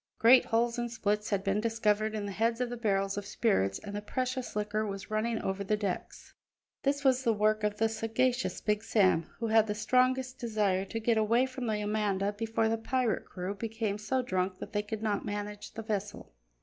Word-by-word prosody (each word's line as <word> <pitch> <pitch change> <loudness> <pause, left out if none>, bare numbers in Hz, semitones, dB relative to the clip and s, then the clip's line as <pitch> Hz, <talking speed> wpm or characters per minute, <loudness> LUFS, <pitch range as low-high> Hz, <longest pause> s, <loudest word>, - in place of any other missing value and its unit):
Great 245 +3 +7
holes 235 +1 +1
and 240 -1 -2
splits 210 -2 -1
had 200 -2 0
been 200 +1 +1
discovered 220 -1 +1
in 210 -1 -3
the 200 - -4
heads 230 +4 0
of 250 -1 -1
the - - -3
barrels 195 -4 0
of 200 - -9
spirits, 100 - +1
and 205 0 -8
the 205 - -3
precious 255 +3 -3
liquor 210 +1 -1
was 200 -1 -5
running 220 +1 0
over 190 +1 -2
the 210 +2 0
decks. 200 -4 -4 0.5
This 280 +1 0
was 260 -1 +3
the 230 - +3
work 215 +1 +2
of 210 0 0
the 225 - +3
sagacious 225 -1 0
Big 210 0 0
Sam, 185 -7 +3
who 230 - -3
had 220 0 +5
the 210 - -2
strongest 255 +3 +1
desire 210 -5 0
to 225 - -4
get 225 0 +2
away 230 +4 +3
from 255 -1 -5
the 215 -1 0
Amanda 205 -1 0
before 225 +1 0
the 225 0 0
pirate 250 0 0
crew 185 +1 -5
became 215 0 -3
so 255 +5 0
drunk 185 -4 -1
that - - -8
they 205 - +1
could 215 +1 -5
not 210 -2 0
manage 205 0 -5
the 225 - -6
vessel. 205 - -4
215 Hz, 210 wpm, -30 LUFS, 205-230 Hz, 0.5 s, Great